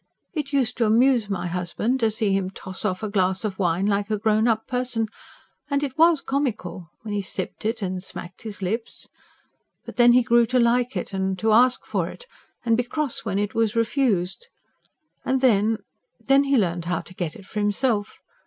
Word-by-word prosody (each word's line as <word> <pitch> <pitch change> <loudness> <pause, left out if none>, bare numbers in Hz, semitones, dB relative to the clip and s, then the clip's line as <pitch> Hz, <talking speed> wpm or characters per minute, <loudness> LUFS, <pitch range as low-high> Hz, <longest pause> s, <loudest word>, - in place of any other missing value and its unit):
It 295 -4 -3
used 265 -4 +1
to 230 - +2
amuse 235 0 +3
my 180 -3 -2
husband 180 +8 -1
to 225 -2 +3
see 215 -2 0
him 195 -1 0
toss 190 -1 -6
off 185 -1 -1
a - - 0
glass 190 -1 +1
of 195 -2 -4
wine 180 0 +1
like 200 0 0
a 215 - 0
grown 215 +1 +2
up 220 -1 +1
person; 250 -3 -1 0.6
and 280 0 0
it 270 -2 -3
WAS 325 -2 +5
comical, 220 - -3
when 215 -2 -5
he 205 - 0
sipped 195 - -5
it, 225 -1 -1
and 185 -1 -3
smacked 180 -1 -9
his 210 -3 -7
lips. 225 +5 -4 0.8
But 235 -2 -10
then 240 0 +7
he 250 0 +5
grew 235 0 +4
to 255 - +1
like 245 +2 +2
it, - - -5
and 190 0 -1
to 220 +3 +1
ask 250 +3 +4
for - - -1
it, 485 - -12 0.4
and 230 -1 +4
be 245 - +1
cross 285 0 -2
when 195 -3 -1
he 205 +1 +1
was 225 -1 +1
refused. 230 - 0 0.8
And 265 0 +1
then... 225 -3 +3 0.4
then 275 +1 +3
he 275 -1 +3
learnt 175 -5 0
how 175 -1 -1
to - - -13
get 175 -4 -4
it 200 - -12
for 210 - -5
himself. 205 +1 0
220 Hz, 200 wpm, -24 LUFS, 195-245 Hz, 0.8 s, then